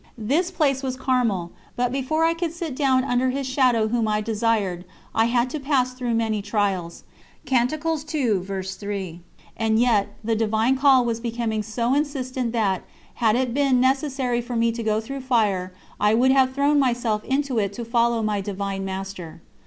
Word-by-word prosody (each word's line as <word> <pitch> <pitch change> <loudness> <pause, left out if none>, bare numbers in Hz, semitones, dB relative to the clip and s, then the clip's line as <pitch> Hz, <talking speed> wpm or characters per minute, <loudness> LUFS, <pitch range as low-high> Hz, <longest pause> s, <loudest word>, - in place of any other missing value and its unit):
This 285 - 0
place 295 -7 +1
was 260 -2 -3
Carmel, 230 -10 0 0.2
but 245 0 0
before 275 +5 0
I 330 - +3
could 335 -1 -3
"sit 330 -4 -5
down 260 -2 +2
under 255 -1 +1
His 275 +1 -2
Shadow 255 -4 +2
Whom 230 -1 0
I 210 0 +1
desired," 210 -4 0 0.3
I 225 - +3
had 240 +1 +2
to 305 - -3
pass 270 -3 +1
through 245 -2 -2
many 220 -2 0
trials. 200 -5 -2 0.5
And 245 -1 +3 2.0
yet 225 -3 +3
the 225 +1 0
Divine 220 +3 +1
Call 265 -2 +5
was 230 -1 -1
becoming 230 -2 -2
so 230 +4 -1
insistent 260 -4 -1
that, 205 -5 0 0.3
had 225 -3 +2
it 250 -1 0
been 275 -2 +3
necessary 265 -2 +1
for 240 0 -6
me 230 0 +2
to 230 +1 -5
go 215 -1 0
through 275 +4 -6
fire, 210 -8 +1 0.3
I 210 +1 +3
would 255 +3 +4
have 260 -1 +3
thrown 285 +1 +3
myself 240 -5 0
into 270 -3 0
it 200 -2 0
to 235 +3 -6
follow 235 -1 +1
my 210 -2 0
Divine 195 0 -4
Master. 190 -4 -6
240 Hz, 170 wpm, -23 LUFS, 215-265 Hz, 2.0 s, Call